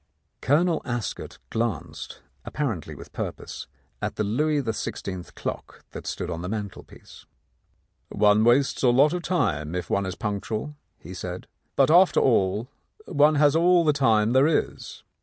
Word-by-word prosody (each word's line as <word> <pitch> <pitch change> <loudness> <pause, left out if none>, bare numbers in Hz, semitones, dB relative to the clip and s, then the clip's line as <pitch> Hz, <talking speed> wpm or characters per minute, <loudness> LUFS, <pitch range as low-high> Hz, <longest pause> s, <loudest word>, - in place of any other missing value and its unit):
Colonel 160 +4 +2
Ascot 120 -3 -5
glanced, 115 -8 -4 0.2
apparently 120 - -4
with - - -12
purpose, - - -6 0.3
at - - -3
the 110 - -1
Louis 145 +9 +1
XVI. 95 -5 -5
clock - - -6
that - - -8
stood - - -4
on 85 - -4
the 90 - -5
mantelpiece. 105 -2 -8 0.8
"One 105 +1 +3
wastes 125 +4 +3
a 125 - +4
lot 140 +6 +4
of 180 - -2
time 90 - -1
if 90 -1 -4
one 100 -1 +1
is 95 - -4
punctual," 110 +7 -4 0.2
he - - -11
said. - - -6 0.3
"But, 135 +2 +4
after 180 +3 +6
all, 105 -2 +2 0.4
one 150 +2 +3
has 145 0 +4
all 175 +1 +4
the 150 - +4
time 115 -5 +2
there 135 +3 +5
is." 160 - -2
120 Hz, 150 wpm, -25 LUFS, 105-150 Hz, 0.8 s, after